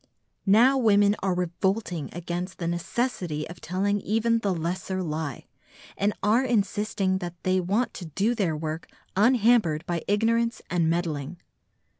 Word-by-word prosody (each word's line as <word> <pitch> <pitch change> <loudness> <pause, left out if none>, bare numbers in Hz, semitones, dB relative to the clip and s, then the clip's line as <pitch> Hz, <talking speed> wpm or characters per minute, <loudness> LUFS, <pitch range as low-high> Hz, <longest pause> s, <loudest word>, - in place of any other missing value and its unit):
Now 245 +7 +6
women 205 -3 +4
are 190 -2 0
revolting 180 -1 -1
against 175 +2 -5
the 170 - -4
necessity 175 -3 -2
of 170 0 -11
telling 200 +3 0
even 230 +2 +1
the 205 -3 0
lesser 185 +2 -2
lie, 155 -3 -4 0.5
and 200 +1 +1
are 220 +5 +4
insisting 205 -4 0
that 175 -2 -5
they 185 0 +2
want 200 +7 0
to 180 - -7
do 195 +9 0
their 185 -9 0
work 155 +1 -4 0.3
unhampered 220 -7 +3
by 170 -2 -2
ignorance 230 +3 +1
and 170 -3 +2
meddling. 165 -2 -2
190 Hz, 140 wpm, -26 LUFS, 170-215 Hz, 0.5 s, Now